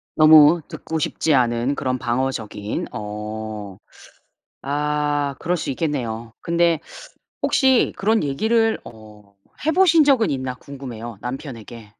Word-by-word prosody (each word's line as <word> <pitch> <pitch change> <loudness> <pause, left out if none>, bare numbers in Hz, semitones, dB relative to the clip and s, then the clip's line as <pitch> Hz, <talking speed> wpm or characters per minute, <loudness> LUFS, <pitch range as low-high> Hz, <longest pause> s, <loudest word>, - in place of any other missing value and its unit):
너무 155 +1 +7
듣고 160 0 -5
싶지 155 +1 0
않은 120 +1 +1
그런 130 -1 -1
방어적인. 120 -4 -3
어. 105 -1 -6 0.8
아 145 0 -1
그럴 180 +2 0
수 - - -4
있겠네요. 120 -6 -3
근데 170 0 +2 0.6
혹시 265 -3 +3
그런 220 -1 +2
얘기를 220 +11 +1
어 105 -3 -14 0.3
해 315 - +3
보신 335 -3 +5
적은 260 -6 +3
있나 130 -2 -3
궁금해요 120 -6 -9
남편에게. 120 -3 -8
135 Hz, 240 characters per minute, -21 LUFS, 115-160 Hz, 0.8 s, 너무